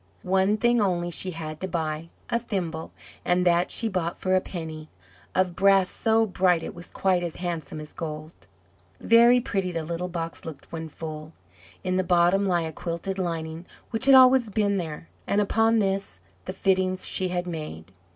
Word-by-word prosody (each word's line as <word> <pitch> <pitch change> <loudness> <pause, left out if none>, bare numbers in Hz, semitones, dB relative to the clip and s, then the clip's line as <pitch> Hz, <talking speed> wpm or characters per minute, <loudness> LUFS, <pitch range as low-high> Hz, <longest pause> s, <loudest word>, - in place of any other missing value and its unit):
One 190 +3 +2
thing 240 0 +3
only 175 -3 0
she 185 - 0
had 155 -3 -6
to 190 - -3
buy 160 -2 -3 0.2
a 235 - 0
thimble, 175 -8 -4 0.3
and 180 0 +2
that 175 0 +3
she 230 - +1
bought 180 -4 -2
for 185 - -1
a 185 - +4
penny, 160 -4 -7 0.5
of 185 -2 +1
brass 195 0 +4
so 225 0 +2
bright 180 -4 +2
it - - -6
was 175 0 -11
quite 185 -2 +1
as 170 -2 -4
handsome 165 -4 -4
as 150 0 -9
gold. 155 0 -6 0.7
Very 235 +2 +6
pretty 195 -6 -2
the 165 -2 -3
little 170 +2 -3
box 165 -1 -5
looked 155 -4 -10
when 160 -1 -5
full; 155 0 -8 0.5
in 185 0 0
the 185 - +2
bottom 180 +2 +3
lay 175 -3 +1
a 160 - -4
quilted 170 +4 -4
lining, 165 -1 -4 0.2
which 225 +2 0
had 270 - +8
always 255 -2 +6
been 200 -1 +1
there, 165 -2 -5 0.2
and 200 - +2
upon 225 +2 +3
this 195 -1 -1 0.3
the 185 - -4
fittings 185 -1 +1
she 185 - 0
had 180 0 -2
made. 155 - -7
180 Hz, 180 wpm, -25 LUFS, 165-195 Hz, 0.7 s, had